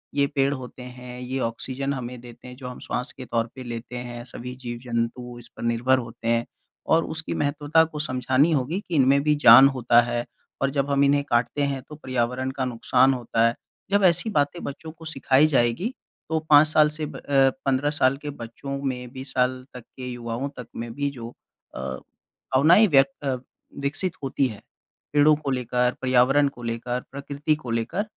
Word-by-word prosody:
ये 140 - +3
पेड़ 140 -1 +1
होते 130 -2 -8
हैं, 125 0 -9
ये 130 +2 -3
ऑक्सिजन 130 +4 -2
हमें 125 -2 -6
देते 120 0 -13
हैं 125 - -10
जो 130 -1 -8
हम 125 - -8
श्वास 125 - -3
के 130 - -7
तौर 115 -1 -1
पे 130 - -8
लेते 120 0 -7
हैं, 120 -1 -7
सभी 125 0 -8
जीव-जंतु 120 0 -4
इस 120 - -13
पर - - -7
निर्भर 120 +3 +2
होते 115 -1 -8
हैं, 115 0 +2 0.4
और 165 +1 +3
उसकी 160 0 -4
महत्वता 145 +2 +2
को 155 -2 -6
समझानी 130 +2 +2
होगी 150 +5 0
कि 175 - -3
इन 135 -4 +5
में 140 +1 +4
भी 150 0 +3
जान 120 +4 +10
होता 120 -3 +4
है, 120 0 -2 0.4
और 135 - +2
जब 140 0 -1
हम 140 0 +3
इन्हें 140 0 +3
काटते 120 +4 +1
हैं 140 -2 -1
तो 150 - -8
पर्यावरण 130 -2 -2
का 135 -1 -2
नुकसान 125 +2 +2
होता 115 -2 0
है। 115 - -1 0.4
जब 200 0 +3
ऐसी 175 +4 +3
बातें 150 -2 0
बच्चों 160 +3 -7
को 165 0 -14
सिखाई 140 -1 +3
जाएगी, 135 - +1 0.4
तो 160 0 +1
5 150 +1 +8
साल 155 0 +4
से 155 0 -4
ब - - -8
अ, - - -11 0.4
15 135 +1 +1
साल 135 -2 +2
के 150 - -5
बच्चों 140 +1 -6
में 125 -2 -3
भी 130 -1 -7
साल 130 -1 0
तक 125 - -9
के 130 -1 -6
युवाओं 120 +1 -4
तक 125 - -7
में 115 0 -5
भी 145 +2 -1
जो 120 -4 -8 0.5
अ, - - -6 0.4
भावनाएँ 160 +11 +3
व्यक्त 135 -3 +2
अ, 135 -2 +1 0.5
विकसित 150 +6 -2
होती 135 0 +1
हैं, 110 -4 -9 0.5
पेड़ों 150 +1 +6
को 145 -2 -4
लेकर, 125 -1 0
पर्यावरण 130 +3 +4
को 125 -3 -8
लेकर, 120 +2 -3
प्रकृति 140 +2 -2
को 140 -6 -7
लेकर, 115 - -1
130 Hz, 195 wpm, -24 LUFS, 120-145 Hz, 0.5 s, जान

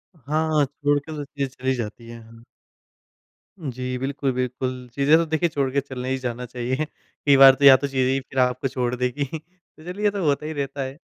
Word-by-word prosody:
हाँ, 155 +1 0
छोड़ 145 +1 0
के 150 +3 -11
तो 145 - -4
चीज़ें 140 -1 -3
चली 130 0 -2
जाती 115 0 -6
है, 115 0 -10
हाँ। 115 +1 -16 1.2
जी, 130 -3 -4
बिल्कुल, 135 +1 -2
बिल्कुल, 125 0 -3
चीज़ें 140 +3 +4
तो 165 - +1
देखिए 160 +2 0
छोड़ 140 -3 -1
के 140 - +3
चलने 130 -2 -6
ही 130 - 0
जाना 125 -1 -4
चाहिए। 125 +4 -2
कई 145 -1 -1
बार 135 -1 +9
तो 140 +2 +1
या 135 - +11
तो 140 +2 -3
चीज़ें 130 -1 +1
ही 135 - +1
फिर 135 0 -5
आपको 125 +1 +1
छोड़ 125 -1 -2
देगी, 125 +3 -1 0.2
तो 170 -1 -23
चलिए 180 +5 -6
ये 205 - +4
तो 200 -3 -3
होता 145 +1 +1
ही 155 - -4
रहता 140 -1 -4
है, 130 +1 -6
135 Hz, 215 wpm, -23 LUFS, 125-145 Hz, 1.2 s, या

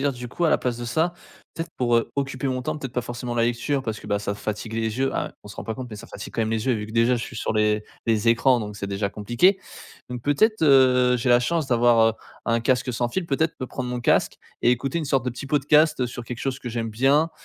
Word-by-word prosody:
dire, - - -5
du 125 0 -8
coup, 170 +8 -2
à 160 - +4
la - - +4
place 125 -2 -2
de 120 - -6
ça, 160 +9 0 0.4
peut-être 165 0 -5
pour, 120 -2 +3
heu, 115 - 0
occuper 135 -1 -2
mon 130 0 -1
temps, 155 +3 -2
peut-être 135 -4 -6
pas 125 - 0
forcément 120 0 -5
la 115 - +2
lecture 120 +4 -1
parce 110 -3 -4
que - - -12
bah 100 0 0
ça 100 0 -3
fatigue 105 +2 -5
les 110 +1 -2
yeux, 135 0 0
à - - -2
on 105 - -12
se - - -11
rend - - -6
pas 110 - -3
compte 130 -1 -7
mais 105 - -7
ça 105 - -10
fatigue 100 - -9
quand 115 - +1
même 110 - -1
les 110 +1 -1
yeux 130 - +3
vu 105 -1 -4
que 110 - -10
déjà 115 +2 +3
je 115 - -4
suis - - -10
sur - - -2
les 105 0 +2 0.2
les 115 0 +2
écrans, 120 +2 +4
donc 105 -1 -6
c'est 100 - -4
déjà 100 +1 -2
compliqué. 120 - +2 0.5
Donc 125 -1 -4
peut-être, 215 - +2
heu, 130 -3 +5
j'ai 125 +1 -2
la 120 - +6
chance 160 +4 0
d'avoir, 120 -2 +4
heu, - - -5 0.3
un 115 0 +2
casque 125 +1 +1
sans 120 +1 -1
fil. 175 +9 -2
Peut-être 160 +2 0
me 130 - -3
prendre 125 0 -5
mon 125 0 -3
casque - - +2 0.3
et 120 - +5
écouter 135 +6 0
une 160 - -3
sorte 135 -2 +1
de 125 - -1
petit 125 +3 -7
podcast 150 0 +3
sur 120 0 -7
quelque 120 0 -6
chose 135 0 -2
que 125 - -6
j'aime 115 -1 -3
bien, 140 +8 +3
125 Hz, 280 wpm, -24 LUFS, 115-135 Hz, 0.5 s, la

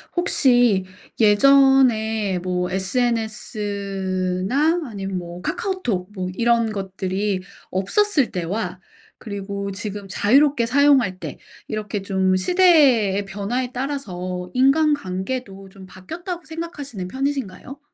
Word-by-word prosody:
혹시 245 - +3 0.3
예전에 220 -4 +4
뭐 180 0 -2
SNS나 200 - -1
아님 195 -5 -5
뭐 175 0 -7
카카오톡 370 - -2
뭐 185 -2 -4
이런 235 0 +2
것들이 195 0 -2 0.3
없었을 280 - +1
때와 180 +1 -3 0.4
그리고 200 -1 -5
지금 205 0 -6
자유롭게 255 +6 +3
사용할 265 -7 +4
때 - - -7 0.3
이렇게 210 -1 -4
좀 190 -1 +1
시대의 255 - +4
변화에 205 +6 -3
따라서 185 -10 -4
인간관계도 255 -7 0
좀 190 0 -13
바뀌었다고 335 - -7
생각하시는 300 - -6
편이신가요? 270 +1 -4
210 Hz, 250 characters per minute, -22 LUFS, 190-270 Hz, 0.4 s, 예전에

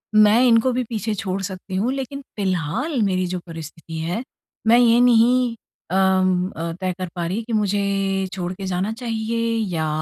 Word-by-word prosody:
मैं 215 +2 +6
इनको 230 +2 +4
भी 250 +1 0
पीछे 220 -1 -2
छोड़ 195 -2 -3
सकती 190 -1 -6
हूँ, 215 +7 +1
लेकिन 275 +1 -5 0.2
फिलहाल 195 - -1
मेरी 185 -2 +1
जो 180 0 -3
परिस्थिति 165 0 -8
है 175 +9 -2 0.4
मैं 230 +2 +7
ये 235 -1 +5
नहीं 245 0 +4 0.4
अम, 185 -1 +2
अ, 165 +1 -3
तय 185 -1 0
कर 185 -1 -3
पा 175 -1 -2
रही 200 +7 -2
कि 230 +1 -6
मुझे 200 -2 0
छोड़ 180 -2 -3
के 195 +1 -7
जाना 185 +3 -1
चाहिए 230 -1 -2 0.3
या 160 -1 0
200 Hz, 175 wpm, -22 LUFS, 185-230 Hz, 0.4 s, मैं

